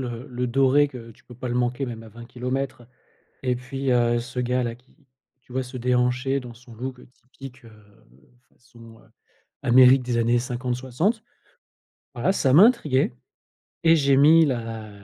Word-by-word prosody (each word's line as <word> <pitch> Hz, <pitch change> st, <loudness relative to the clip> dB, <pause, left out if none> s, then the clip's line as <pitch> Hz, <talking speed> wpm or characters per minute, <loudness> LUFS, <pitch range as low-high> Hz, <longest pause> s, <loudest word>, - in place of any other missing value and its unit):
le 120 Hz, +2 st, -7 dB
le 125 Hz, 0 st, -3 dB
doré 135 Hz, +3 st, +3 dB
que 120 Hz, -4 st, -11 dB
tu -, -, -26 dB
peux 120 Hz, -, -14 dB
pas 125 Hz, +1 st, -6 dB
le 120 Hz, -, -3 dB
manquer 125 Hz, +2 st, -1 dB
même 115 Hz, -2 st, -7 dB
à 115 Hz, -, -13 dB
20 115 Hz, +2 st, -12 dB
kilomètres 125 Hz, +2 st, -4 dB, 0.6 s
et 125 Hz, -1 st, 0 dB
puis, 135 Hz, +2 st, -4 dB
heu, 120 Hz, -1 st, +2 dB
ce 125 Hz, +1 st, -6 dB
gars-là 125 Hz, -1 st, -1 dB
qui, 125 Hz, +2 st, -28 dB, 0.5 s
tu 130 Hz, -, -21 dB
vois, 130 Hz, +1 st, -2 dB
se 125 Hz, +1 st, -12 dB
déhancher 125 Hz, +2 st, 0 dB
dans 125 Hz, -2 st, -10 dB
son 120 Hz, -1 st, -16 dB
look 125 Hz, +2 st, -6 dB
typique, 130 Hz, 0 st, -14 dB
heu, 115 Hz, -, -15 dB, 0.8 s
façon 115 Hz, -2 st, -18 dB, 0.6 s
Amérique 125 Hz, +1 st, +6 dB
des 120 Hz, -1 st, -2 dB
années 115 Hz, +1 st, +2 dB
50-60. 130 Hz, -, -2 dB, 0.9 s
Voilà 190 Hz, -, 0 dB
ça 135 Hz, -8 st, +1 dB
m'a 180 Hz, -, +9 dB
intrigué 150 Hz, -, +2 dB, 0.7 s
et 165 Hz, 0 st, +6 dB
j'ai 140 Hz, -3 st, +2 dB
mis 155 Hz, +4 st, +6 dB
la 115 Hz, -4 st, -4 dB
125 Hz, 165 wpm, -23 LUFS, 120-135 Hz, 0.9 s, m'a